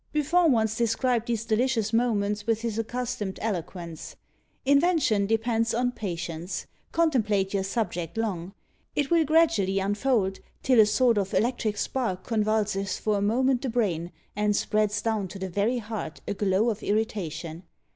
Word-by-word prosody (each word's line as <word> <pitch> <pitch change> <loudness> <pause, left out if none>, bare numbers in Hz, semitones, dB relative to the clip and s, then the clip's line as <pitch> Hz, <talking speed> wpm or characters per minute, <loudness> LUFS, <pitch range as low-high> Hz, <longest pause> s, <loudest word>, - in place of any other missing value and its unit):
Buffon 315 +2 +3
once 220 -2 +2
described 235 0 +1
these 230 -2 -1
delicious 225 -1 +1
moments 210 -3 +1
with 225 -1 +1
his 225 -2 -2
accustomed 225 -4 -3
eloquence: 175 -5 -5 0.5
"Invention 280 - +3
depends 225 +1 +1
on 245 +1 +1
patience; 175 -5 -4 0.3
contemplate 215 - +1
your 200 - +1
subject 185 -4 -3
long; 195 -4 -3 0.4
it 290 +1 0
will 335 -1 +5
gradually 270 - +3
unfold, 205 0 +1 0.2
till 255 -3 +4
a 215 - +7
sort 235 0 +3
of 195 -1 -2
electric 225 -3 0
spark 205 -9 -2
convulses 210 -3 0
for 210 -2 0
a - - -3
moment 250 +5 +2
the 265 - -2
brain, 180 -8 -1 0.2
and 210 0 +1
spreads 210 0 0
down 220 -4 0
to 190 - -9
the 190 0 -4
very 205 +7 0
heart 215 -8 -5
a - - -1
glow 205 +3 +2
of 215 - -6
irritation. 180 -6 -2
215 Hz, 150 wpm, -27 LUFS, 195-240 Hz, 0.5 s, a